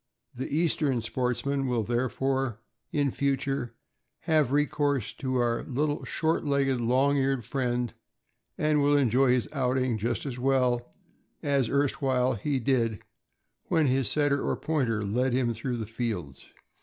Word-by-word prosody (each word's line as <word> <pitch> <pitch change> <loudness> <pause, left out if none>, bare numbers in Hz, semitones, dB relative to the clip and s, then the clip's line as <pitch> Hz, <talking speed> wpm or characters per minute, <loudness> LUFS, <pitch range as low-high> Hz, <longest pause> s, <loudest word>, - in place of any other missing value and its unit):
The 130 +1 -4
Eastern 150 -5 +1
sportsman 130 +3 -1
will, 120 -3 0
therefore, 130 +1 -1 0.3
in 145 -2 +1
future, 135 -3 -1 0.5
have 155 -5 +2
recourse 145 -4 +1
to 130 -2 -2
our 120 -1 +1
little 145 +2 -1
short 160 0 0
legged, 135 -3 +1
long 130 +4 +3
eared 135 -3 0
friend, 125 -2 -1 0.6
and 150 -1 +2
will 145 +1 +4
enjoy 130 0 +3
his 125 -1 +2
outing 130 -4 0
just 120 +5 -2
as 125 -3 -5
well 125 -2 +1 0.5
as 140 -5 +1
erstwhile 135 -2 +1
he 135 +5 -1
did 115 -4 0 0.6
when 160 -2 +2
his 135 -1 +1
Setter 145 -2 +2
or - - -1
Pointer 120 -9 0
led 125 +5 0
him 125 -2 +1
through 120 +2 -3
the 110 - -3
fields. 105 - -4
130 Hz, 140 wpm, -28 LUFS, 120-140 Hz, 0.6 s, will